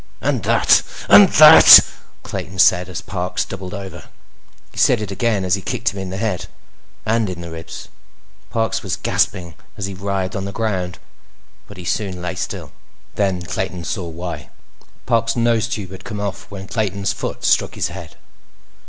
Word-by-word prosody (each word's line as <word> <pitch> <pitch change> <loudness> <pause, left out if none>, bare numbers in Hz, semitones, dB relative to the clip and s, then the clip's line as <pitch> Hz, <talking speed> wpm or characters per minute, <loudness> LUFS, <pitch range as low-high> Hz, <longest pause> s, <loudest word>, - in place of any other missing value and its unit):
"And - - -1
that, - - +4 0.3
that—" - - +10 0.4
Clayton 95 +3 -7
said 90 -1 +4
as 90 - -6
Parks 90 -1 -3
doubled 95 0 -7
over. 100 -1 -9 0.7
He - - -9
said 125 - +4
it 105 -2 -5
again 100 -1 -1
as 90 - 0
he 100 - 0
kicked 120 +3 -2
him 100 - -7
in 95 -1 -5
the 95 - -5
head. 100 -4 -3 0.6
And 110 -1 0
in 90 -1 -6
the 85 -1 -8
ribs. 80 0 -9 0.6
Parks 115 0 -1
was - - -3
gasping 85 -2 -1 0.2
as 100 - -3
he 100 - -6
writhed 95 -1 -3
on 100 -1 -4
the 100 - -5
ground, 95 -5 -3 0.7
but 100 - -13
he 90 - -9
soon 95 -1 -3
lay 90 -1 -4
still. - - -6 0.4
Then 95 -3 -1
Clayton 90 +2 -4
saw 85 +3 -4
why. 85 +2 -7 0.6
Parks' 115 -2 +1
nose 115 -1 +1
tube 105 -5 -5
had 95 0 -10
come 105 - -6
off 100 -2 -5
when 95 -1 -9
Clayton's 100 -3 -2
foot - - -6
struck - - +2
his - - -2
head. - - -10
95 Hz, 170 wpm, -19 LUFS, 90-105 Hz, 0.7 s, that